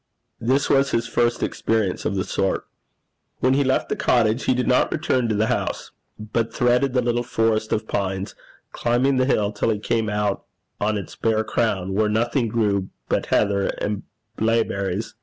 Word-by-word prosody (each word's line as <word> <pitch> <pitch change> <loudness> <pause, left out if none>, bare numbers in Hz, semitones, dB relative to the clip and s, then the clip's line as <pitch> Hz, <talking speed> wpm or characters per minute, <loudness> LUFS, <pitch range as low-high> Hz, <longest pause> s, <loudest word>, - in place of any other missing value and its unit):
This 130 +4 +1
was 135 0 +3
his 115 -2 0
first 120 +1 0
experience 110 -5 -1
of - - 0
the 95 - 0
sort. 95 -1 -1 0.7
When 130 +1 +3
he 140 +1 +3
left 130 0 +1
the - - -1
cottage, 115 0 +2
he 130 - +3
did 125 - -1
not 125 - +3
return 130 -6 0
to 110 - +1
the 105 +1 +2
house, - - -2 0.3
but 110 +2 -2
threaded 125 +1 +2
the 125 -1 +2
little 120 0 +1
forest 110 -2 0
of 110 0 -1
pines, 95 -1 -2 0.4
climbing 125 +3 +1
the 130 0 +2
hill 105 -6 +2
till 105 - -1
he 110 - +1
came 110 +1 -1
out 105 -1 -1 0.4
on 105 +1 0
its 100 - -7
bare 110 -1 +1
crown, 95 -5 -1
where 105 +2 +2
nothing 115 +3 +1
grew 105 -4 0 0.2
but - - 0
heather 100 -1 +2
and 105 -1 -2 0.4
blaeberries. 110 -2 0
110 Hz, 175 wpm, -23 LUFS, 105-120 Hz, 0.7 s, was